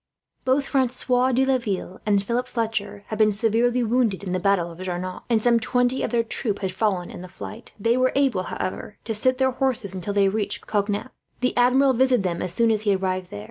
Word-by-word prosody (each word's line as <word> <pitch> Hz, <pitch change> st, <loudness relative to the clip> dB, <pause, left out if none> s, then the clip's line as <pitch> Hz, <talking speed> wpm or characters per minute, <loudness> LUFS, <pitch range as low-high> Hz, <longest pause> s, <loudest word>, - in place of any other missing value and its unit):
Both 265 Hz, +2 st, +2 dB
Francois 255 Hz, -1 st, +1 dB
de 260 Hz, +2 st, +3 dB
Laville 220 Hz, -8 st, -2 dB
and 200 Hz, -1 st, +3 dB
Philip 240 Hz, +4 st, -1 dB
Fletcher 220 Hz, -4 st, -3 dB
had 215 Hz, -, -4 dB
been 215 Hz, -1 st, +5 dB
severely 235 Hz, +4 st, +1 dB
wounded 225 Hz, -4 st, +1 dB
in 185 Hz, -, -4 dB
the 185 Hz, -, 0 dB
battle 185 Hz, -3 st, +1 dB
of 165 Hz, -, -13 dB
Jarnac, 185 Hz, 0 st, -4 dB
and 230 Hz, -2 st, +3 dB
some 235 Hz, +1 st, +3 dB
twenty 245 Hz, +2 st, +1 dB
of -, -, -1 dB
their 235 Hz, -1 st, +1 dB
troop 220 Hz, -2 st, -2 dB
had 190 Hz, -2 st, -3 dB
fallen 190 Hz, -2 st, -1 dB
in -, -, -9 dB
the 185 Hz, -, -8 dB
fight. 220 Hz, +5 st, -9 dB
They 230 Hz, +4 st, +2 dB
were 255 Hz, 0 st, +3 dB
able, 270 Hz, -9 st, +2 dB
however, 200 Hz, +2 st, -5 dB
to 225 Hz, -, -2 dB
sit 255 Hz, +4 st, +1 dB
their 260 Hz, 0 st, +2 dB
horses 250 Hz, -6 st, -1 dB
until 190 Hz, +2 st, -4 dB
they 200 Hz, -1 st, +4 dB
reached 205 Hz, +1 st, -2 dB
Cognac. 205 Hz, +3 st, -1 dB, 0.3 s
The 250 Hz, -, 0 dB
Admiral 260 Hz, +2 st, +4 dB
visited 255 Hz, -3 st, +3 dB
them, 175 Hz, -2 st, -2 dB
as 185 Hz, -, -3 dB
soon 230 Hz, +5 st, +2 dB
as 215 Hz, -1 st, +1 dB
he 205 Hz, -2 st, +2 dB
arrived 185 Hz, -1 st, -2 dB
there. 100 Hz, -, -7 dB
220 Hz, 220 wpm, -24 LUFS, 195-250 Hz, 0.3 s, been